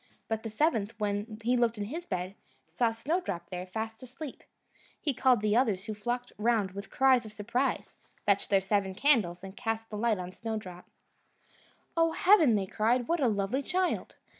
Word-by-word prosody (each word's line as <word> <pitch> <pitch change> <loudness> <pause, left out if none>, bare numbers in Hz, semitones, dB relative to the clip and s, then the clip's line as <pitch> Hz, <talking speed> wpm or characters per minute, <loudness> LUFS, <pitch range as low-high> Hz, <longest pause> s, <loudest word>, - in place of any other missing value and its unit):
But 220 -1 -1
the 225 - -5
seventh, 225 -4 0
when 210 +1 -2
he 245 +2 +3
looked 235 -2 +2
in 205 - -2
his 315 +12 -5
bed, 185 0 -3 0.3
saw 235 -2 +1
Snowdrop 225 - -3
there, 180 0 -5
fast 220 +3 -5
asleep. 260 +3 -8 0.6
He 290 - +1
called 250 -3 +3
the 210 0 +2
others, 215 -6 +2
who 215 - -3
flocked 240 +4 -3
round 215 -3 +2
with 200 +1 -8
cries 260 -2 +4
of 215 - -9
surprise, 240 +6 -2 0.3
fetched 200 -1 +2
their 195 -1 +4
seven 195 -1 0
candles, 210 -9 +2
and 190 0 -8
cast 225 -1 -3
the 210 - -4
light 230 -1 +2
on 180 0 -5
Snowdrop. 205 -4 -6 1.1
"Oh, 330 -1 +3
heaven!" 340 - +5
they 200 -2 0
cried, 235 +5 +1
"what 340 +1 +1
a 260 - +4
lovely 205 +4 0
child!" 365 +5 -1
220 Hz, 180 wpm, -30 LUFS, 200-250 Hz, 1.1 s, heaven